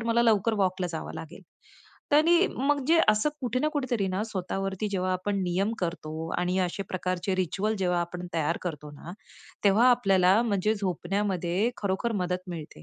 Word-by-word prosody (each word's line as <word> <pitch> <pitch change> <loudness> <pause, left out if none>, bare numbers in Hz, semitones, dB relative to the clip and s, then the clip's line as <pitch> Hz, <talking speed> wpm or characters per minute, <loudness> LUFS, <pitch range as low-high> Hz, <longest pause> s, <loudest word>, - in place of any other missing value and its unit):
तर 230 - -5
मला 235 +1 +3
लवकर 220 -1 +3
वॉकला 185 0 -1
जावं 160 - -5
लागेल. 165 +4 -9 0.7
आणि 340 +5 +5
मग 285 +2 +2
जे 330 +1 +5
असं 215 +7 +4
कुठे 250 +1 0
ना 305 - +2
कुठेतरी 250 -8 -1
ना, 190 +3 -1
स्वतःवरती 195 0 -3
जेव्हा 185 -1 0
आपण 200 +2 -1
नियम 190 +5 0
करतो. 165 -2 -4
आणि 180 +1 0
अशा 180 +2 -1
प्रकारचे 185 +1 -2
रिच्युअल 195 +4 0
जेव्हा 180 -2 +1
आपण 175 +1 -5
तयार 165 +1 0
करतो 150 -4 -5
ना, 165 +4 -10 0.5
तेव्हा 210 +5 +5
आपल्याला 195 -4 +4
म्हणजे 210 -1 +1
झोपण्यामध्ये 195 +1 -1
खरोखर 200 +4 -1
मदत 180 +1 -3
मिळते. 155 - -8
190 Hz, 165 wpm, -27 LUFS, 180-220 Hz, 0.7 s, आणि